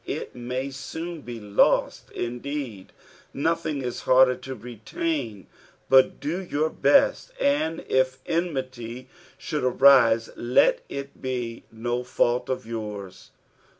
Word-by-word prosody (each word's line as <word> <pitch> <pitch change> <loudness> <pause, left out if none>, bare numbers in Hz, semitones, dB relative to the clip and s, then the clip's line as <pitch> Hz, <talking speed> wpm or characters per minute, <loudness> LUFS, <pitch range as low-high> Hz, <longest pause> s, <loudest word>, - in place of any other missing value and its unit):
It - - -4
may 125 +3 -4
soon 160 +5 -6
be 120 -3 -7
lost, 105 -1 +2
indeed, 120 -4 -5 0.4
nothing 155 -1 -1
is 125 -1 -4
harder 130 0 +5
to 130 +1 -7
retain, 120 - -4 0.4
but 130 0 +5
do 170 +6 -2
your 155 -3 -1
best, 285 - +3
and 225 - 0
if 130 0 +2
enmity 130 -7 -3 0.3
should 150 -4 -3
arise 125 -3 +5
let - - +3
it 140 0 -7
be 120 -3 -4
no 120 +2 -2
^ult 125 0 0
of 130 -4 -2
yours. 105 -4 -7
130 Hz, 115 wpm, -25 LUFS, 120-145 Hz, 0.4 s, harder